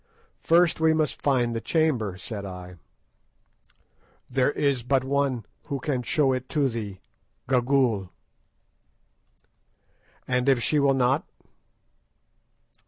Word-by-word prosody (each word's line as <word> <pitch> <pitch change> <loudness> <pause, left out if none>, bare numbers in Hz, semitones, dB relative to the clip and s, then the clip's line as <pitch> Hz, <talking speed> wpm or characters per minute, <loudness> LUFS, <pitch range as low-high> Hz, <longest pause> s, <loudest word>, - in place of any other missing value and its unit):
"First 170 0 +3
we 160 0 +3
must 155 -1 -1
find 120 -4 +1
the 115 - -2
chamber," 125 - 0
said 100 +1 -6
I. 90 -2 -9 1.5
"There 130 +1 +1
is 140 -4 +1
but 130 +2 +1
one 135 -4 0 0.2
who 140 - -3
can 130 -1 -2
show 135 +2 +1
it 130 0 -4
to 145 -4 +1
thee—Gagool." 115 +1 -2 2.2
"And 125 +1 +1
if 125 -4 +3
she 150 - +2
will 140 -1 +3
not?" 130 +1 +1
130 Hz, 105 wpm, -25 LUFS, 115-140 Hz, 2.2 s, First